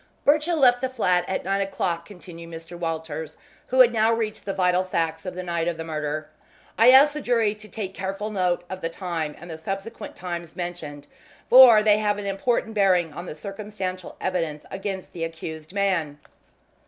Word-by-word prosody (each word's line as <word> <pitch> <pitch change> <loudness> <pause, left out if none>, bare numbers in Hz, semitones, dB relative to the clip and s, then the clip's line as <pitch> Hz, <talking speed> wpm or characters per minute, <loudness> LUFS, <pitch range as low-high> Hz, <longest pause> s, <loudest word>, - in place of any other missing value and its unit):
"Birchill 305 +4 +3
left 245 -4 +5
the 260 - 0
flat 180 -8 +1
at 190 - -3
nine 195 +1 0
o'clock," 170 -3 -2
continued 170 -4 -11
Mr. 165 +1 -9
Walters, 160 -2 -4 0.3
who 260 +1 +5
had 240 -2 +6
now 220 0 +3
reached 225 -2 -2
the 200 - -1
vital 180 -1 +2
facts 165 -2 -2
of 180 - -5
the 185 - -4
night 170 -1 -2
of 170 -1 -1
the 165 - -4
murder. 155 -1 -3 0.5
"I 230 +3 +6
ask 275 +3 +7
the 300 - -4
jury 230 -5 +2
to 215 0 -13
take 195 -4 -5
careful 195 +3 -4
note 180 -3 0
of 185 0 -7
the 165 - -2
time 165 -4 -4
and 170 - -11
the 160 -2 -7
subsequent 195 +7 -6
times 175 -2 -6
mentioned, 170 -5 -6 0.5
for 240 -4 +9
they 210 -1 +4
have 210 -1 +1
an 205 - -5
important 220 +3 -1
bearing 185 -6 +2
on 175 - -7
the - - -6
circumstantial 195 0 -6
evidence 165 -5 -2
against 195 -1 -5
the 170 - -4
accused 160 -1 -6
man. 185 -7 0
185 Hz, 190 wpm, -24 LUFS, 165-210 Hz, 0.5 s, for